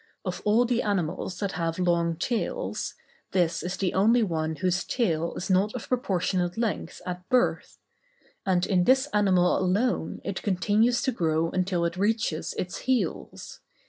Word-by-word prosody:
Of - - -3
all 220 +4 +4
the 245 0 +1
animals 180 -2 -2
that 200 -1 -2
have 165 -2 -2
long 170 -2 +1
tails, 240 - -2 0.4
this 175 -3 +1
is 180 +2 -4
the 190 -2 -1
only 225 +5 +4
one 160 -4 -1
whose 180 +4 0
tail 170 -9 -1
is 180 - -4
not 195 +4 +2
of 250 - -6
proportionate 185 -6 0
length 230 -2 -3
at 180 0 -6
birth; 250 -1 +1 0.7
and 185 -2 +1
in 180 -3 +2
this 260 +1 +4
animal 190 -4 +3
alone 190 0 0
it 195 -1 -4
continues 210 +5 +2
to 260 - +1
grow 165 -5 0
until 180 -2 0
it 170 +1 -2
reaches 205 -5 0
its 180 - -3
heels. 260 -2 -2
185 Hz, 155 wpm, -27 LUFS, 175-220 Hz, 0.7 s, all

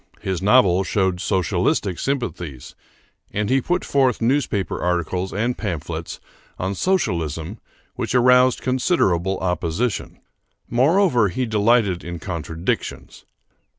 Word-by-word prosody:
His 95 -2 -3
novels 95 -3 +4
showed 95 -3 0
socialistic 95 - 0
sympathies, 90 - -4 0.6
and 105 +3 -1
he 135 0 +3
put 180 +7 -1
forth 130 -4 +2
newspaper 120 -5 0
articles 90 +1 -1
and 115 +5 -1
pamphlets 85 -4 -5 0.4
on 95 +2 -2
Socialism 90 - -1 0.4
which - - -2
aroused 125 0 +5
considerable 95 - +1
opposition. 90 +5 -2 0.5
Moreover, 130 - +3
he 125 +8 -2
delighted 105 -4 +2
in 85 0 -6
contradictions. 85 -1 -4
100 Hz, 105 wpm, -21 LUFS, 90-125 Hz, 0.6 s, aroused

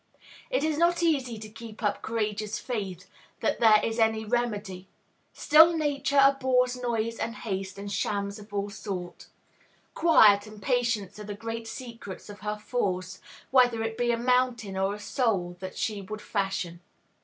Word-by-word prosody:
It - - 0
is 310 -1 0
not 345 0 +3
easy 270 -8 +1
to 215 0 -8
keep 220 +1 -11
up 205 -1 0
courageous 215 -1 -2
faith 195 -7 -5 0.3
that - - 0
there 220 -2 +7
is 225 +1 -1
any 220 -1 +2
remedy. 210 -5 -2 0.4
Still 325 +3 +6
Nature 285 -2 +1
abhors 260 -2 +3
noise 230 -2 -2
and 230 0 -3
haste, 195 -3 -4
and 200 0 -6
shams 200 +1 -2
of 210 0 -14
all 200 0 -2
sorts. 185 -4 -6 0.7
Quiet 215 -11 +5
and 215 0 -11
patience 230 -4 -1
are - - -6
the 205 0 -6
great 225 +1 -5
secrets 230 -5 -8
of 205 - -10
her 210 +1 -3
force, 190 -5 -2 0.3
whether 245 -3 +4
it 225 0 -3
be 240 +1 0
a 235 - +1
mountain 245 -4 +1
or 195 +1 0
a - - -10
soul 200 -7 -1
that 185 0 -7
she 210 -2 -2
would 215 +3 -7
fashion. 190 -4 -2
220 Hz, 165 wpm, -27 LUFS, 200-245 Hz, 0.7 s, there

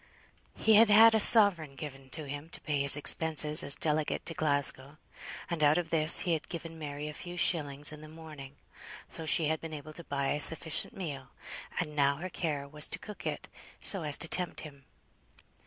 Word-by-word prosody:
He 220 - +1
had 220 +1 +4
had 225 +2 +5
a 220 - +1
sovereign 195 -10 +7
given 135 -2 -11
him 145 0 -9
to - - -8
pay 145 -3 -4
his 140 +1 +6
expenses 155 0 +3
as 140 - +3
delegate 155 -1 -3
to 165 - -4
Glasgow, 145 -2 -2 0.5
and 170 -2 -6
out 150 +1 +2
of 170 -2 -5
this 155 -1 +5
he 175 -3 -2
had 160 - -6
given 165 -1 -9
Mary 145 0 -8
a 150 - -8
few 175 +3 -10
shillings 145 -5 +1
in 150 - -13
the 155 - -13
morning; 155 -3 -13 0.5
so 160 - -10
she 155 0 +2
had 160 0 -4
been 160 -1 -9
able 150 +1 -12
to 170 - -13
buy 140 -3 -4
a 150 - -3
sufficient 160 +3 -3
meal, 145 -8 -8 0.5
and 150 -4 -5
now 140 -1 0
her 180 +6 -9
care 145 -5 -5
was 150 +1 -1
to - - -7
cook 210 - -11
it - - -7 0.3
so 195 - -1
as 150 -2 -5
most - - -4
to 165 - -4
tempt 180 +1 -2
him. 140 -3 -14
155 Hz, 205 wpm, -28 LUFS, 145-165 Hz, 0.5 s, sovereign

